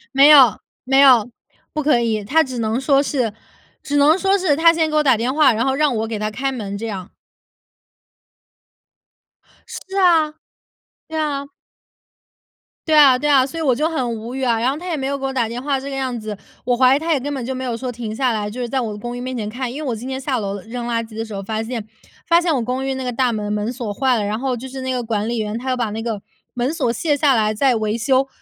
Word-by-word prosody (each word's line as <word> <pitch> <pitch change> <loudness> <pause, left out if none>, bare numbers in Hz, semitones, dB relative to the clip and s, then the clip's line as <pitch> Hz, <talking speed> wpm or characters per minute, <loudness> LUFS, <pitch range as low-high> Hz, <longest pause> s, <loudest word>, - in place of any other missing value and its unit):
没 275 +1 +7
有 270 -7 +7 0.2
没 270 +1 +3
有， 255 -6 +6 0.5
不 305 - -1
可 285 -5 +3
以。 220 -3 -1
他 315 +10 +3
只 255 -2 -6
能 225 +1 0
说 275 +1 +3
是 255 -6 -1 0.5
只 290 0 -2
能 295 +4 +5
说 390 +1 +2
是 360 -6 +1
他 330 +2 +6
先 325 -1 +1
给 305 - -3
我 305 - +3
打 265 -5 +4
电 240 +4 -1
话， 305 +1 +5
然 225 +3 0
后 265 - +1
让 285 -2 +1
我 220 +1 -2
给 220 -2 -4
他 215 0 -1
开 270 +6 -2
门 205 -6 -5
这 225 - -5
样。 195 -5 -6 2.5
是 385 +1 -7
啊， 330 -5 +4 0.8
对 320 0 -4
啊。 285 -2 -2 1.4
对 315 - +2
啊， 280 -4 +7
对 295 +3 -1
啊， 270 -3 +5
所 330 - -8
以 325 - -2
我 265 -4 +3
就 305 +6 0
很 255 -7 -2
无 230 +3 -7
语 265 - -3
啊。 235 -2 +2
然 240 +3 +1
后 275 - -2
他 360 +3 -7
也 330 - -1
没 270 -1 -2
有 280 0 -2
给 270 - -10
我 270 - -1
打 250 -4 0
电 235 +2 -5
话 280 -1 0
这 275 +1 -7
个 275 - -5
样 260 -2 -2
子， 215 -2 -6 0.3
我 245 0 +2
怀 255 +1 +5
疑 285 - 0
他 330 +1 0
也 290 - +1
根 290 +3 -4
本 260 -4 -4
就 260 +1 -3
没 260 - -5
有 240 -3 -3
说 255 +2 -4
停 230 -3 -5
下 250 +1 0
来， 210 -1 -2
就 240 - -8
是 245 - -2
在 260 +2 -1
我 225 - -3
的 210 - -7
公 240 +2 -5
寓 - - -6
面 255 +1 -4
前 210 - -3
看。 245 +1 -4
因 285 +5 -6
为 295 - -4
我 235 - -1
今 225 +3 -8
天 265 0 -4
下 265 -1 -1
楼 200 -2 -3
扔 235 +4 -6
垃 235 -1 -1
圾 225 -1 -11
的 225 - -2
时 220 -1 -9
候 195 - -4
发 220 +2 -3
现 225 -2 -5 0.4
发 340 0 +5
现 345 -2 +1
我 265 - 0
公 250 +3 -2
寓 270 - -1
那 260 - -4
个 - - -1
大 250 0 +1
门 210 -2 -3
门 210 +2 -2
锁 235 -5 -5
坏 255 +2 +1
了， 215 - -1
然 210 +2 -2
后 255 0 -2
就 255 +3 -8
是 265 0 -7
那 260 0 -2
个 250 -1 -1
管 220 -2 -2
理 240 - -2
员 215 0 -2
他 255 +2 -5
要 255 - 0
把 235 -4 -1
那 220 +1 -4
个 225 -4 -3 0.3
门 250 +4 -1
锁 260 -7 0
卸 295 +5 0
下 285 -2 +3
来 215 -1 +1
再 260 +4 +2
维 215 0 -1
修。 265 +3 +2
255 Hz, 290 characters per minute, -20 LUFS, 225-280 Hz, 2.5 s, 没